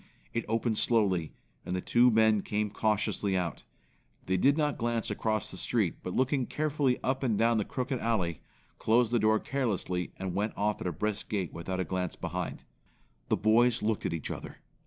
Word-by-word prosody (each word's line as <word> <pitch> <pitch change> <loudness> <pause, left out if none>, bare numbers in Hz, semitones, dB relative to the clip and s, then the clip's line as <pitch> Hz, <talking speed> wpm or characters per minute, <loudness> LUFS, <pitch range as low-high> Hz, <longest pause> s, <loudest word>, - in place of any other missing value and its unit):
It 115 - -1
opened 115 0 +1
slowly, 95 -9 +2 0.3
and 90 - -3
the - - 0
two 120 +6 +4
men 110 -2 +4
came 105 0 -1
cautiously 105 -2 0
out. 85 -5 -3 0.6
They 95 - +1
did 140 - +4
not 150 -2 0
glance 120 -1 -1
across 110 -2 -1
the - - -7
street, - - +1
but 90 - -5
looking 130 0 +1
carefully 145 -4 +1
up 130 +1 0
and 115 -6 +1
down 115 +1 +3
the 105 - -1
crooked 130 0 -2
alley, 90 - -1 0.4
closed 115 +1 +3
the 120 - +3
door 110 0 +3
carelessly, 100 -9 -2
and 95 -2 -4
went 105 +4 -1
off 105 +1 0
at - - -2
a - - 0
brisk 105 +6 -3
gait 95 -7 -2
without 95 +2 -4
a 95 - 0
glance 90 +1 -2
behind. - - -4 0.7
The - - +3
boys 115 +2 +3
looked 110 0 0
at - - -3
each 80 - -4
other. - - -7
110 Hz, 190 wpm, -30 LUFS, 95-120 Hz, 0.7 s, two